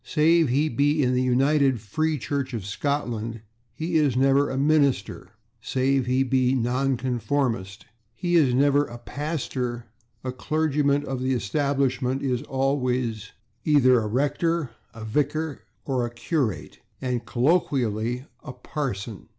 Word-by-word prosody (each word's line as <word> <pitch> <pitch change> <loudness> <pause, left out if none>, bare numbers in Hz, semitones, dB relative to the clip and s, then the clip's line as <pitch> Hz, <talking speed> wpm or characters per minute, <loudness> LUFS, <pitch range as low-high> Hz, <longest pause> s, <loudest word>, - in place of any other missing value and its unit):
Save 160 -1 +3
he 140 +5 +2
be 145 +3 +2
in 125 0 +2
the 125 - +2
United 135 +1 +2
Free 155 +10 -1
Church 135 0 -3
of 105 -5 -5
Scotland, 115 -1 -2 0.3
he 160 +7 -1
is 145 -5 +2
never 135 +2 +3
a - - -3
/minister/; 140 -6 +1 0.3
save 130 +1 0
he 130 +1 +2
be 130 -1 +2
a - - +2
nonconformist, 125 -4 -1 0.3
he 175 +7 -2
is 150 -7 +5
never 140 +3 +3
a 120 - -9
/pastor/; 125 -3 -4 0.4
a 130 - -3
clergyman 145 +1 0
of 130 -1 -4
the 130 +1 +1
Establishment 135 +2 0
is 125 -3 0
always 130 -6 -1 0.3
either 130 -5 +5
a 110 -1 -3
/rector/, 145 +5 0 0.2
a 110 -1 -9
/vicar/ 150 +5 -1 0.3
or 130 -3 0
a 120 - -2
/curate/, 120 - -2 0.2
and 125 -2 -2
colloquially 125 - 0 0.2
a 135 - -7
/parson 125 -6 -5
130 Hz, 135 wpm, -25 LUFS, 120-145 Hz, 0.4 s, is